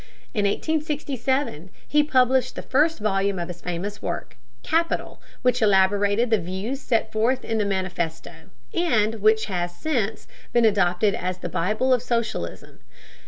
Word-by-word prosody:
In 205 -2 +1
1867 275 - -1 0.2
he 295 - +4
published 255 -3 +2
the - - -5
first 310 +5 +2
volume 200 -2 0
of 175 0 -4
his 175 -1 -8
famous 180 +4 -4
work, 170 - -4 0.3
Capital, 335 +1 -1 0.2
which 250 -1 +2
elaborated 205 +3 +3
the 220 - +4
views 190 +10 -4
set 230 -3 0
forth 235 +4 +1
in 225 -1 -1
the 210 - +1
Manifesto, 175 -3 -3 0.2
and 225 - +1
which 220 +1 +4
has 175 -3 -3
since 225 -9 -1 0.3
been 240 -1 +4
adopted 200 -1 +3
as 185 -1 -3
the 175 - -5
"Bible 215 +9 +1
of 250 - +2
Socialism." 235 -2 -3
215 Hz, 145 wpm, -24 LUFS, 190-255 Hz, 0.3 s, he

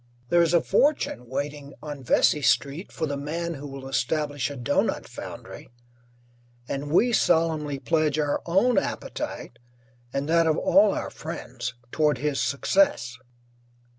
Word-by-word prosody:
There 175 - +5
is 170 0 +3
a 170 - +4
fortune 200 - +1
waiting 145 +1 -4
on 145 -2 -6
Vesey 150 +4 +3
Street 140 +6 +1
for - - -2
the 145 -2 -3
man 165 +4 -3
who 145 -1 -7
will 135 -1 -8
establish 145 +2 -1
a 145 - -7
doughnut 120 - 0
foundry, - - -9 1.0
and 145 +1 -4
we 240 +9 +4
solemnly 155 -6 +2
pledge 155 0 +1
our 145 -2 0
own 200 +8 +4
appetite 120 - -5 0.5
and 140 +2 -2
that 165 0 +3
of 155 0 +2
all 290 +2 +4
our - - -4
friends - - -6 0.2
toward 150 -2 +2
his 150 -2 -1
success. 140 -5 +2
150 Hz, 140 wpm, -25 LUFS, 140-170 Hz, 1.0 s, There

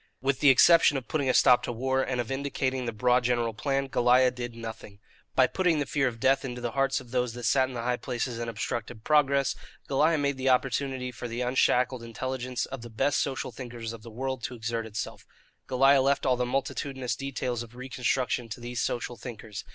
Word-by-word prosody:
With 135 0 0
the 145 - +6
exception 150 +2 +6
of 130 - -6
putting 140 -4 0
a - - +3
stop 125 -1 +6
to - - -3
war, 130 +3 0
and 130 -2 -2
of 120 +1 -3
indicating 135 -1 -2
the - - -1
broad 125 +3 +2
general 120 -2 +1
plan, 135 +4 -1
Goliah 125 0 +4
did 120 -1 -6
nothing. 110 -3 -8 0.4
By - - +6
putting 180 -4 +1
the 145 - 0
fear 140 0 +1
of 115 -2 -4
death 135 +3 +3
into 125 -2 -5
the 120 -1 -3
hearts 135 +1 +1
of 125 -2 -14
those 125 -2 0
that 120 0 -8
sat 130 +2 +3
in 130 - -8
the 115 - -3
high 125 0 0
places 120 -2 -3
and 120 0 -3
obstructed 115 0 -4
progress, 140 -2 +3 0.3
Goliah 155 +4 +3
made 140 -1 0
the 130 0 0
opportunity 130 0 0
for 120 0 -7
the 120 +1 -4
unshackled 125 0 +2
intelligence 125 +2 -3
of 135 -2 -7
the 120 - -9
best 135 +5 +1
social 135 -2 -3
thinkers 115 -2 -7
of 115 - -10
the 115 - -10
world 130 +3 -4
to 125 - -5
exert 115 0 -3
itself. 110 0 -6 0.4
Goliah 135 +1 +5
left 140 +1 +1
all 130 - +3
the 125 0 -1
multitudinous 135 0 -2
details 130 -3 -3
of 120 0 -10
reconstruction 125 -1 -1
to 115 - -6
these 120 0 -4
social 120 0 -2
thinkers. 110 -4 -8
125 Hz, 215 wpm, -28 LUFS, 120-135 Hz, 0.4 s, the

